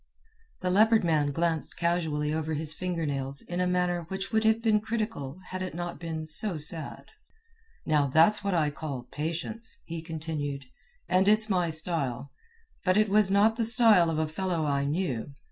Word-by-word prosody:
The 180 Hz, -1 st, -1 dB
Leopard 220 Hz, +3 st, +4 dB
Man 155 Hz, -4 st, +1 dB
glanced 165 Hz, +1 st, -2 dB
casually 160 Hz, -3 st, -1 dB
over 160 Hz, 0 st, -2 dB
his 155 Hz, +1 st, +1 dB
finger 175 Hz, -1 st, -3 dB
nails 140 Hz, -1 st, -4 dB
in 175 Hz, +1 st, -5 dB
a 180 Hz, -, +1 dB
manner 180 Hz, -1 st, 0 dB
which 190 Hz, +1 st, -5 dB
would 220 Hz, 0 st, +1 dB
have 220 Hz, +1 st, +3 dB
been 220 Hz, -2 st, +2 dB
critical 215 Hz, -, -4 dB
had 185 Hz, 0 st, -5 dB
it 185 Hz, -3 st, -5 dB
not 175 Hz, -3 st, -5 dB
been 160 Hz, -2 st, -5 dB
so 165 Hz, +4 st, +3 dB
sad. 150 Hz, 0 st, 0 dB, 0.8 s
"Now, 150 Hz, -3 st, +2 dB
that's 165 Hz, +10 st, +4 dB
what 200 Hz, -2 st, -1 dB
I 155 Hz, -3 st, +1 dB
call 145 Hz, -4 st, -6 dB
patience," 170 Hz, +9 st, -4 dB
he 165 Hz, -1 st, -6 dB
continued, 155 Hz, -4 st, -5 dB, 0.4 s
"and 185 Hz, +1 st, +2 dB
it's 215 Hz, +1 st, +3 dB
my 180 Hz, -3 st, +1 dB
style. 155 Hz, -5 st, -2 dB, 0.5 s
But 185 Hz, +1 st, +2 dB
it 215 Hz, -1 st, +3 dB
was 205 Hz, -1 st, +4 dB
not 210 Hz, +3 st, +3 dB
the 235 Hz, -, 0 dB
style 220 Hz, -7 st, +6 dB
of 160 Hz, -, -2 dB
a 160 Hz, -, +1 dB
fellow 170 Hz, 0 st, -2 dB
I 140 Hz, -1 st, 0 dB
knew. 145 Hz, -4 st, -3 dB
170 Hz, 180 wpm, -27 LUFS, 155-195 Hz, 0.8 s, style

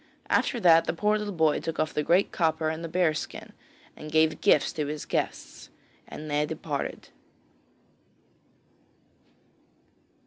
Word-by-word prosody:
After 245 Hz, -, +1 dB
that 165 Hz, -4 st, +5 dB
the -, -, -1 dB
poor 210 Hz, +4 st, +1 dB
little 210 Hz, -1 st, -4 dB
boy 160 Hz, -4 st, +2 dB
took 165 Hz, -1 st, -5 dB
off 155 Hz, -, 0 dB
the 150 Hz, -, 0 dB
great 175 Hz, +6 st, +2 dB
copper 160 Hz, -2 st, 0 dB
and 160 Hz, +1 st, -5 dB
the -, -, -3 dB
bear 170 Hz, -1 st, +2 dB
skin, 155 Hz, -, -7 dB, 0.4 s
and 155 Hz, -, -9 dB
gave 160 Hz, 0 st, +2 dB
gifts 150 Hz, -, +3 dB
to 150 Hz, -2 st, -3 dB
his 150 Hz, +1 st, -5 dB
guests, -, -, -4 dB, 0.4 s
and 155 Hz, -, -8 dB
they 150 Hz, 0 st, +1 dB
departed. 150 Hz, -2 st, -5 dB
160 Hz, 140 wpm, -27 LUFS, 155-170 Hz, 0.4 s, that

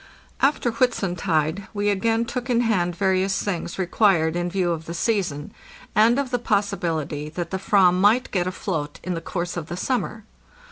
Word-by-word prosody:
After 270 Hz, -3 st, +2 dB
Whitsuntide 185 Hz, -, 0 dB
we 205 Hz, 0 st, +1 dB
again 225 Hz, +3 st, +1 dB
took 250 Hz, +1 st, -5 dB
in 240 Hz, -1 st, +3 dB
hand 180 Hz, -7 st, +1 dB
various 190 Hz, 0 st, +1 dB
things 180 Hz, -4 st, -3 dB
re 190 Hz, -, 0 dB
quired 175 Hz, -4 st, +3 dB
in 175 Hz, 0 st, -1 dB
view 180 Hz, -1 st, 0 dB
of 160 Hz, -1 st, -4 dB
the 170 Hz, -, -5 dB
season, 170 Hz, -7 st, -1 dB, 0.4 s
and 225 Hz, +4 st, +5 dB
of 275 Hz, -2 st, -1 dB
the 245 Hz, -, +1 dB
possibility 165 Hz, -9 st, -1 dB
that 170 Hz, +1 st, -5 dB
the 190 Hz, -, -2 dB
/vam 195 Hz, -3 st, +4 dB
might 215 Hz, +6 st, +3 dB
get 180 Hz, -2 st, 0 dB
afloat 165 Hz, -5 st, -3 dB
in 185 Hz, -, -2 dB
the 165 Hz, -, -4 dB
course 175 Hz, 0 st, -4 dB
of 160 Hz, -3 st, -4 dB
the 175 Hz, -, -5 dB
summer. 220 Hz, -1 st, -2 dB
190 Hz, 180 wpm, -23 LUFS, 170-220 Hz, 0.4 s, and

